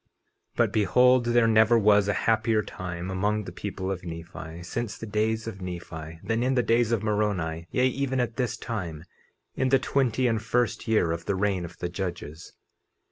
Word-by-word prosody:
50:23 - - -47 0.5
But - - +2
behold 125 +4 +4
there 120 -1 +4
never 110 +1 +5
was 105 -2 +4
a 105 - +2
happier 110 -1 +2
time 90 -1 -6
among 105 +3 0
the - - -8
people 95 -1 -4
of 90 -2 -4
Nephi, 85 0 -8
since 115 +5 -4
the - - -7
days 110 +1 0
of 95 -4 -7
Nephi, 80 -3 -7
than 115 +1 0
in 130 +2 +1
the 125 - +3
days 115 0 +2
of 115 -3 +1
Moroni, 95 -7 -1
yea, 125 +7 +2
even 130 0 -1
at 120 -2 -1
this 120 -3 -1
time, 85 -9 -5 0.5
in 130 - 0
the 135 - +5
twenty 130 -2 +1
and 115 -3 +1
first 120 0 0
year 110 -7 +2
of 85 0 -4
the 100 - 0
reign 95 -2 0
of 85 0 -11
the 90 - -3
judges. 85 -3 -6
105 Hz, 190 wpm, -26 LUFS, 90-115 Hz, 0.5 s, never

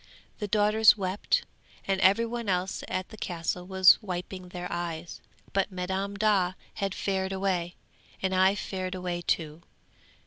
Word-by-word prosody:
The 210 - -2
daughters 210 +1 +5
wept, 190 0 0 0.4
and 195 0 0
every 200 +5 +5
one 230 -2 -4
else 185 +1 -1
at 185 0 -3
the 220 - -11
Castle 180 -1 -3
was 190 +1 +6
wiping 185 -1 -5
their 180 0 -6
eyes; 170 -1 -4 0.3
but 195 +1 +1
Madam 190 +2 -3
Daa 200 -4 +2 0.2
had 195 -3 -2
fared 190 -1 -1
away, 185 -3 -1 0.4
and 190 0 -1
I 190 +1 +4
fared 185 -2 -4
away 180 -1 -3
too! 160 -2 -1
190 Hz, 145 wpm, -28 LUFS, 180-200 Hz, 0.4 s, was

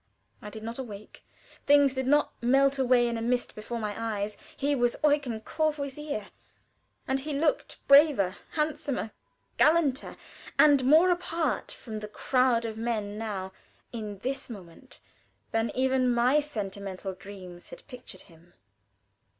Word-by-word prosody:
I 210 - -7
did 220 0 -9
not 230 +3 -6
awake; 215 -5 -9 0.4
things 285 -2 +5
did 260 -1 -2
not 295 +2 +3
melt 275 +3 +3
away 250 -2 +4
in 235 -1 -2
a - - -5
mist 245 +1 -1
before 215 +3 -6
my 210 -2 -3
eyes. 210 -2 -3 0.2
He 285 +1 +1
was 240 -3 +1
Eugen 285 -7 +1
Courvoisier, 295 -5 -3 0.8
and 265 0 +1
he 295 +2 -4
looked 300 0 0
braver, 275 - +6 0.2
handsomer, 300 -7 -2 0.5
gallanter, 300 -4 +2 0.4
and 285 -3 +6
more 320 +7 +6
apart 345 -2 -1
from 220 -3 -7
the 210 - -6
crowd 250 +1 +1
of 220 -1 -5
men 215 -3 -2
now, 195 -4 -4 0.4
in 210 -3 -5
this 265 +1 -3
moment, 200 +3 -12 0.5
than 225 0 0
even 260 -1 +2
my 245 +5 +3
sentimental 200 -7 -5
dreams 185 -2 -11
had - - -12
pictured 250 -4 -10
him. 170 0 -20
245 Hz, 140 wpm, -28 LUFS, 215-280 Hz, 0.8 s, braver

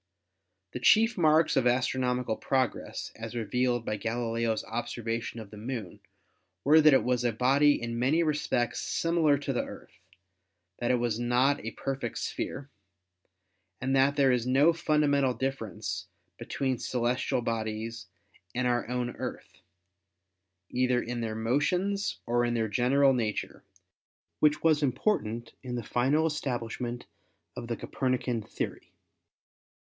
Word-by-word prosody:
The - - -5
chief 225 +2 +5
marks 155 -2 +4
of 130 -2 +3
astronomical 125 -1 +1
progress 130 0 -2
as 115 +1 -7
revealed 120 +1 0
by 105 - -2
Galileo's 115 0 -1
observation 115 0 -4
of 110 -3 -10
the 105 - -10
Moon 110 -4 -5 0.6
were 155 +3 +6
that 150 -2 +7
it - - +3
was 125 -1 0
a 120 - +2
body 135 +5 +3
in 115 0 -4
many 145 +7 +3
respects 150 -6 0
similar 165 -3 +2
to 140 -1 -3
the 125 - 0
Earth, - - -11 0.8
that 120 - -1
it 125 - +4
was 120 -2 -1
not 125 +4 +2
a 110 - -3
perfect 135 -4 -3
sphere, 135 +1 -4 1.1
and 135 +1 0
that 135 +1 +4
there 140 -2 +4
is 125 -1 0
no 140 +6 +5
fundamental 145 -5 +2
difference 110 -7 -4 0.3
be - - -7
tween 130 -3 -1
celestial 125 0 0
bodies 115 0 -3 0.5
and 125 0 0
our 120 -1 0
own 125 -1 -1
Earth, - - -7 1.1
either 125 0 +2
in 120 0 -4
their 110 -1 -3
motions 180 - 0
or 120 +1 +1
in 120 0 0
their 110 -1 +1
general 135 +5 +3
nature, 110 -4 -3 0.8
which 150 0 +3
was 155 -2 +4
important 120 - -1
in 125 -1 -5
the 120 - -3
final 135 +8 +1
establishment 120 -5 -3 0.5
of 120 - -6
the 115 -1 -3
Copernican 125 -3 -1
theory. - - -6
125 Hz, 140 wpm, -29 LUFS, 115-140 Hz, 1.1 s, that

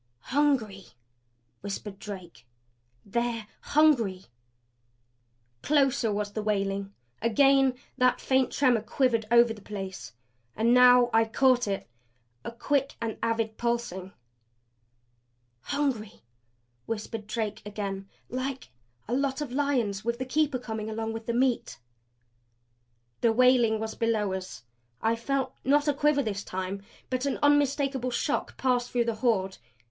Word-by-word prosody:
"Hungry!" 250 -10 +1 0.7
whispered 200 0 -6
Drake. 175 - -9 0.6
"They're 235 +1 -2
HUNGRY!" 240 -12 +2 1.4
Closer 275 -6 +2
was 205 0 -2
the 215 - -2
wailing; 200 -1 -1 0.3
again 270 +3 +4 0.2
that 250 0 +3
faint 260 -1 +1
tremor 250 -5 +3
quivered 230 0 0
over 235 -1 +5
the 210 - -13
place. 195 - -7 0.4
And 230 +2 +3
now 250 -1 +7
I 225 0 +5
caught 245 +1 +3
it 195 -1 -3 0.6
a - - -5
quick 275 +3 -1
and 230 -1 -4
avid 225 -1 -1
pulsing. 235 -6 -2 1.5
"Hungry," 235 - -3 0.6
whispered 215 -1 -5
Drake 215 -1 -3
again. 200 -2 -5 0.2
"Like 260 - -4 0.4
a 235 - -3
lot 270 +1 0
of 295 -4 -4
lions 250 -8 0
with 235 +1 -1
the 260 - -3
keeper 295 0 +1
coming 220 -3 -5
along 225 0 -3
with 225 0 -7
meat." 245 +1 0 1.4
The 230 - +3
wailing 240 -2 +4
was 220 0 -4
below 220 -4 0
us. 185 -8 -6 0.4
I 225 +1 +1
felt, 260 +2 -2
not 290 +3 +3
a 295 - +3
quiver 290 0 +2
this 205 -3 -3
time, 190 +1 -4 0.3
but 255 +2 0
an 275 - -1
unmistakable 280 -3 +2
shock 265 +4 -2
pass 250 -2 +1
through 240 -1 0
the 230 - 0
Horde. 195 -6 +1
235 Hz, 125 wpm, -28 LUFS, 210-260 Hz, 1.5 s, now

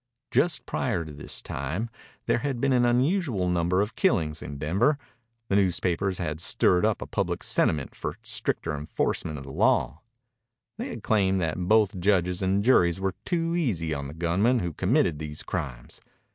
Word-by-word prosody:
Just 165 -2 +1
prior 105 -10 -1
to 75 - -9
this 70 - -6
time 75 +12 -3 0.4
there 115 - +2
had 135 -2 -2
been 135 +1 +2
an 120 -1 +4
unusual 125 - +1
number 90 +1 +2
of 105 - -6
killings 80 - +1
in 70 +1 -6
Denver. 100 - +2 0.5
The 100 - +2
newspapers 95 0 +1
had 75 -3 -3
stirred 90 +2 +3
up 110 -1 +1
a - - -8
public - - -2
sentiment 75 -4 +1
for 75 +4 -5
stricter 110 -8 -2
enforcement 75 +1 -2
of 70 - -8
law. 70 +1 +1 0.8
They 245 - -3
had 235 - -7
claimed 95 -4 +2
that 85 +2 -2
both 105 -2 +3
judges 90 -1 +2
and 95 +2 +1
juries 90 -8 +4
were 95 -1 -1
too 165 -1 0
easy 95 - 0
on 70 -1 -4
the 75 - -9
gunmen 90 +9 +2
who 85 -7 -2
committed 75 0 +1
these 75 -1 -5
crimes. - - -5
90 Hz, 170 wpm, -26 LUFS, 80-115 Hz, 0.8 s, an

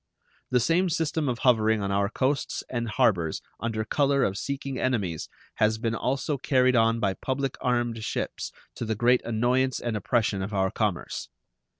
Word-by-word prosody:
The 125 - +3
same 170 +9 +2
system 160 -2 0
of 120 - -1
hovering 110 -3 +3
on 100 - -1
our 100 0 +1
coasts 135 +4 -1
and 120 -2 -3
harbors 100 -9 +2 0.2
under 110 -2 -2
color 140 +3 +2
of 95 - 0
seeking 135 +4 -4
enemies 100 -11 -1 0.3
has 110 0 +3
been 115 0 -1
also 135 +4 -1
carried 130 -1 +3
on 115 0 +3
by 100 -3 +1
public 135 +4 -2
armed 120 -3 0
ships - - -3 0.2
to - - -5
the 110 0 -1
great 120 +3 +3
annoyance 125 +3 +1
and 120 -2 -2
oppression 110 -2 0
of 100 +2 -4
our 95 -1 +1
commerce. 105 -5 -2
120 Hz, 170 wpm, -27 LUFS, 110-130 Hz, 0.3 s, The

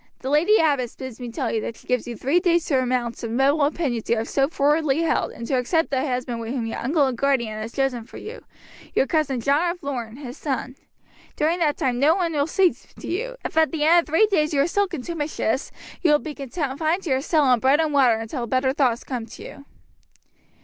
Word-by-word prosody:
The 265 - -3
lady 345 +9 +4
abbess 280 - +1
bids 260 -3 -8
me 245 -1 -6
tell 240 0 -3
you 220 - -1
that 230 - -5
she - - -19
gives 250 -2 -1
you 240 -2 -6
three 280 +10 +2
days 345 -2 +2
to 275 - +1
renounce 250 -2 -1
the 230 - -4
rebel 270 +6 +2
opinions 285 -6 -1
you 235 - +3
have 225 +2 -2
so 275 -1 +1
frowardly 300 0 +1
held, 330 - 0
and 235 - -8
to 260 +1 +1
accept 320 +6 0
the 260 -1 +1
husband 250 -3 -2
whom 230 +1 -3
your 225 - -4
uncle 290 +3 +2
and 260 -2 -1
guardian 235 -5 0
has 220 +1 -5
chosen 260 -4 -1
for - - -12
you, 450 +3 -8 0.5
your - - +4
cousin 285 -3 0
John 290 +8 +2
of 350 0 -6
Lorne, 240 -5 -4
his 260 -3 -8
son. 260 -2 -3 0.6
During 325 +3 +1
that 300 -4 +1
time 255 -6 0
none 330 +5 +3
will 290 -1 +1
speak 365 +1 +2 0.2
to - - -8
you. - - -3
If - - -4
at 320 -1 +4
the 315 -3 -1
end 335 +3 +6
of 340 - -1
three 325 +8 +4
days 310 -7 +1
you 275 - +4
are 285 - +2
still 405 +3 +1
contumacious 295 -6 -3 0.3
you 345 - +3
will 295 - +6
be 300 0 -7
confined 300 +5 -2
to 320 - -3
your 260 0 +2
cell 310 +1 +2
on 250 -3 +4
bread 270 +5 +3
and 315 -2 +1
water 260 -5 +5
until 225 +2 -4
better 260 +3 +1
thoughts 255 -5 +1
come 245 -4 -5
to - - -11
you." 280 - -11
275 Hz, 235 wpm, -23 LUFS, 250-320 Hz, 0.6 s, end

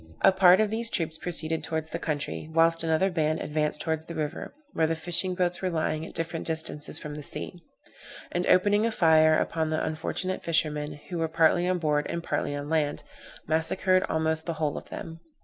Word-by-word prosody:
A - - +8
part 185 -1 +6
of 215 -1 +1
these 230 +1 +2
troops 160 -5 -1
proceeded 160 -2 -1
towards 160 0 -3
the - - -3
country, 155 0 -4
whilst 165 +1 +3
another 165 +4 +1
band 155 -2 0
advanced 150 0 -1
towards 160 -1 -2
the 170 - -8
river, 150 -2 -4 0.2
where 160 - +2
the 165 - -1
fishing 175 +3 +2
boats 180 -1 -1
were 185 - 0
lying 160 -1 -2
at - - -13
different 165 0 -3
distances 160 -2 0
from 150 - -6
the 150 - -7
sea; 175 +4 -4 0.7
and 175 +1 -1
opening 205 +3 +4
a - - -1
fire 160 -5 +4
upon 160 -1 -1
the 155 0 -1
unfortunate 175 +4 -3
fishermen, 150 -2 0 0.2
who 175 - -3
were 165 - 0
partly 165 +2 +3
on 185 0 +1
board 150 -3 0
and 170 0 -4
partly 145 - -2
on 145 0 -5
land, 150 -2 0 0.4
massacred 175 +4 +1
almost 160 0 -1
the 170 - -1
whole 155 -2 -2
of - - -8
them. 165 0 -8
160 Hz, 200 wpm, -27 LUFS, 155-175 Hz, 0.7 s, A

